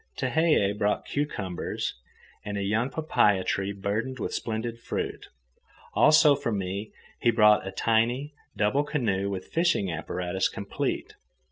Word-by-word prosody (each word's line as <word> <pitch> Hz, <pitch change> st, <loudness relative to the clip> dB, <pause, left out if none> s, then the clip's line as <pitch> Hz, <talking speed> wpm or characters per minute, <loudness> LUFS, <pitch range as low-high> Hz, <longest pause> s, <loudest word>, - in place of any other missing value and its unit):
Tehei 155 Hz, -12 st, +2 dB
brought 105 Hz, 0 st, 0 dB
cucumbers 105 Hz, -, -3 dB, 0.5 s
and 105 Hz, -1 st, -4 dB
a 100 Hz, -, -1 dB
young 110 Hz, +6 st, 0 dB
papaia 105 Hz, -11 st, +2 dB
tree 95 Hz, +1 st, -1 dB
burdened 105 Hz, +6 st, -3 dB
with -, -, -4 dB
splendid 115 Hz, +1 st, -3 dB
fruit. -, -, -4 dB, 0.7 s
Also, 155 Hz, -1 st, +6 dB
for 125 Hz, -4 st, -3 dB
me 100 Hz, +1 st, -3 dB, 0.3 s
he 120 Hz, -, +3 dB
brought 105 Hz, -3 st, +5 dB
a -, -, -4 dB
tiny, 115 Hz, +8 st, +1 dB, 0.2 s
double 110 Hz, +8 st, +2 dB
canoe 105 Hz, -10 st, -1 dB
with 95 Hz, -2 st, -6 dB
fishing 165 Hz, -, +2 dB
apparatus 90 Hz, +3 st, -2 dB
complete. -, -, -3 dB
105 Hz, 130 wpm, -27 LUFS, 100-130 Hz, 0.7 s, Also